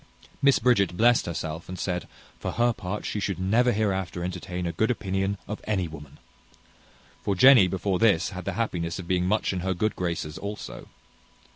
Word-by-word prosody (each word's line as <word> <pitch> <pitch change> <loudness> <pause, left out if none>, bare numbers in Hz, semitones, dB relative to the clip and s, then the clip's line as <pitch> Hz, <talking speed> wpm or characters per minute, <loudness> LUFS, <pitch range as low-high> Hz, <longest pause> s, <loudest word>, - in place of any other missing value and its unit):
Miss 140 -1 +5
Bridget 100 -7 +2
blessed 120 0 +4
herself, 80 -1 -5
and 95 - -5
said, 90 0 -3 0.3
"For - - -4
her 120 0 +2
part, 100 0 -5
she 105 - -2
should 100 -2 -2
never 110 +7 +3
hereafter 95 -5 -1
entertain 90 0 -4
a 85 - -1
good 110 +7 0
opinion 95 -3 -1
of 105 +2 -5
any 95 -5 0
woman." 75 -2 -11 1.0
For 100 - -1
Jenny 125 -2 +8
before 95 0 -1
this 100 -7 +3
had 90 -2 -7
the - - -2
happiness 85 -8 -2
of 90 -2 -7
being 90 0 +1
much 105 0 +1
in 95 - -2
her 95 +1 -1
good 110 +5 0
graces 85 -4 -3
also. 105 +1 -7
95 Hz, 180 wpm, -26 LUFS, 90-105 Hz, 1.0 s, Jenny